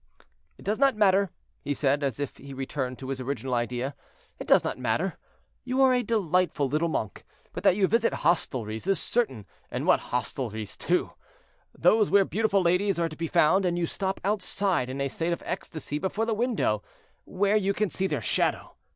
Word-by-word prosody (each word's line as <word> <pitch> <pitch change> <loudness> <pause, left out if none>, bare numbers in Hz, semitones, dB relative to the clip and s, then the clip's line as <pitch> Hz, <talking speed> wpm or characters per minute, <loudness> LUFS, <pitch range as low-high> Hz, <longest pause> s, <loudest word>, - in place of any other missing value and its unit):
"It - - -15
does 210 +4 0
not 275 -3 +4
matter," 200 -2 +4 0.3
he 145 0 -1
said, 140 +1 +1
as 140 -2 -2
if 145 -2 -3
he 140 0 -10
returned 130 -1 -3
to 130 - -8
his 135 -1 -3
original 130 -1 -3
idea; 125 +3 -1 0.5
"it - - -7
does - - +5
not - - -3
matter, - - 0 0.5
you 255 +1 -2
are 260 -1 +5
a 250 - +2
delightful 185 - +1
little 155 +5 0
monk; 110 - -3 0.3
but - - -5
that - - +4
you 200 -1 +3
visit 230 +4 +2
hostelries 120 - -1
is 195 - +2
certain, 135 - -1 0.2
and - - -3
what - - +5
hostelries 110 -3 -3
too! 180 +1 0 0.7
Those 215 -2 +4
where 200 -1 +5
beautiful 200 -2 +1
ladies 180 +3 +2
are 170 -1 0
to 155 - -9
be 165 +1 -3
found, 175 +6 +4
and 175 -1 0
you 175 - +1
stop 190 +3 -3
outside 195 -7 0
in 130 +2 -5
a 140 - 0
state 165 +5 -2
of - - -6
ecstasy 155 -4 -4
before 200 +6 -1
the 225 - 0
window, 215 - 0 0.4
where 200 +2 +1
you 200 -2 +2
can 205 -2 -1
see 190 - 0
their - - -2
shadow. - - 0
170 Hz, 195 wpm, -27 LUFS, 135-200 Hz, 0.7 s, does